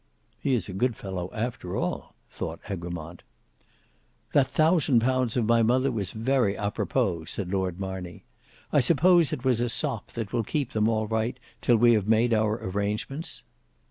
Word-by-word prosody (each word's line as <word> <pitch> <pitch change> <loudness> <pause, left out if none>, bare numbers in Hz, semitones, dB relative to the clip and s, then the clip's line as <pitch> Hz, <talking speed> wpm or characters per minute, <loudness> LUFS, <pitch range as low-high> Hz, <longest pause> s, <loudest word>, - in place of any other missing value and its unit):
"He 135 - +1
is 115 - -2
a 95 - -6
good 120 +5 0
fellow 95 -3 -5
after 115 -5 -4
all," - - -3
thought - - -6
Egremont. 85 -2 -6 1.1
"That 135 -2 +4
thousand 155 -4 +3
pounds 130 -1 +1
of 120 - +2
my 115 +1 +4
mother 130 +4 +2
was 100 -5 -3
very 115 -2 +1
a 100 0 -2
propos," 95 -9 -1
said 90 -2 -3
Lord 95 -2 -1
Marney; 95 -2 -6 0.5
"I - - +6
suppose 170 +4 +4
it 135 -4 -4
was 125 -3 +3
a 120 - 0
sop 110 -1 -2
that 115 -2 -5
will 120 -2 +1
keep 140 +3 -2
them 110 0 +2
all 110 -1 +1
right 110 +2 -1 0.2
till 120 - +4
we 120 +1 +6
have 105 -3 +1
made 115 +2 +3
our 110 -1 +2
arrangements." 105 - -3
115 Hz, 175 wpm, -27 LUFS, 100-125 Hz, 1.1 s, I